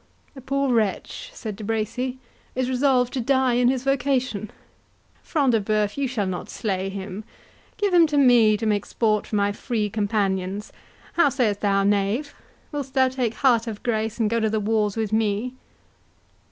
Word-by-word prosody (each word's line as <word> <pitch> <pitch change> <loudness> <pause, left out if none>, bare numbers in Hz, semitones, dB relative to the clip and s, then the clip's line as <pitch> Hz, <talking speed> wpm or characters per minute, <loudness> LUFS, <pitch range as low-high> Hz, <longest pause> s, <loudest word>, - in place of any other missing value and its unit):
"The 270 - -11
poor 275 0 0
wretch," 225 - -1
said 220 - -6
De 215 - -9
Bracy, 225 +4 -2 0.4
"is 255 0 0
resolved 255 -1 +2
to 260 - -1
die 260 0 +2
in 245 0 +3
his 255 0 +1
vocation.—Front 260 +1 -2
de 225 -2 +2
Bœuf, 210 0 0
you 280 -1 -1
shall 235 -5 -1
not 185 -1 -4
slay 195 -4 -2
him. 195 +1 -6 0.5
Give 410 -3 0
him 340 -2 +6
to 295 -1 -1
me 240 -6 +5
to 225 - -4
make 210 -2 0
sport 215 -3 0
for - - -3
my 200 0 +2
Free 210 -1 -2
Companions.—How 205 - -1
sayst 230 -7 0
thou, 195 -1 +2
knave? 205 +8 0 0.4
Wilt 285 -3 -4
thou 260 -1 +4
take 250 -3 -2
heart 240 -4 +3
of 215 -2 -6
grace, 220 -3 -1
and 225 - +2
go 230 +2 +1
to 220 -1 +1
the 215 0 0
wars 210 0 0
with 220 -1 -2
me?" 220 +3 0
225 Hz, 170 wpm, -24 LUFS, 210-260 Hz, 0.5 s, him